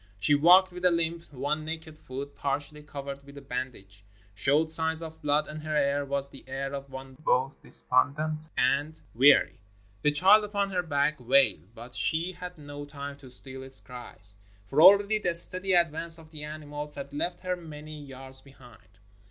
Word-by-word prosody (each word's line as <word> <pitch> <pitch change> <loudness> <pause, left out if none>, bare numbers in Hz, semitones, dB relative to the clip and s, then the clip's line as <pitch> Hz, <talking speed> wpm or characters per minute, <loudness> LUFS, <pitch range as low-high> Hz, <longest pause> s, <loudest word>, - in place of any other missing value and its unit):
She 125 +9 +2
walked 180 +6 +6
with 180 0 -9
a 180 - +6
hmp; 170 -1 -2
one 145 +3 -2
naked 160 0 -7
foot, 140 +1 -8
par 140 -1 -1
tially 150 +1 -12
covered 140 -1 -8
with 140 0 -14
a - - -9
bandage, 125 -6 -7 0.3
showed 145 +9 +1
signs 160 0 +2
of 160 0 -10
blood, 150 0 +1
and 155 0 -8
her 155 0 -3
air 145 -1 +1
was 140 0 -3
the 140 -1 -15
air 135 +1 -4
of 140 0 -6
one 130 0 -9
both 135 0 0
despondent 155 +4 -1
and 140 +5 +1
weary. 135 +5 +5 0.4
The 150 - +3
child 190 +9 +6
upon 200 -1 -2
her 180 -1 0
back 150 -2 0
wailed, 115 - +2
but 120 +2 -11
she 165 +3 +2
had 180 -1 -9
no 145 -1 -9
time 140 -1 -8
to 135 -2 -14
still 130 +1 -3
its 135 0 -5
cries, 110 -5 -8 0.3
for 135 +10 +1
already 200 +4 +7
the 175 -4 0
steady 185 +3 +5
advance 165 -1 +2
of 160 -1 -16
the 150 -2 -8
animals 150 -1 -7
had 140 0 -8
left 175 +5 -3
her 185 -1 -2
many 155 -3 -10
yards 135 -1 -11
behind. 120 -8 -19
145 Hz, 185 wpm, -28 LUFS, 135-160 Hz, 0.4 s, already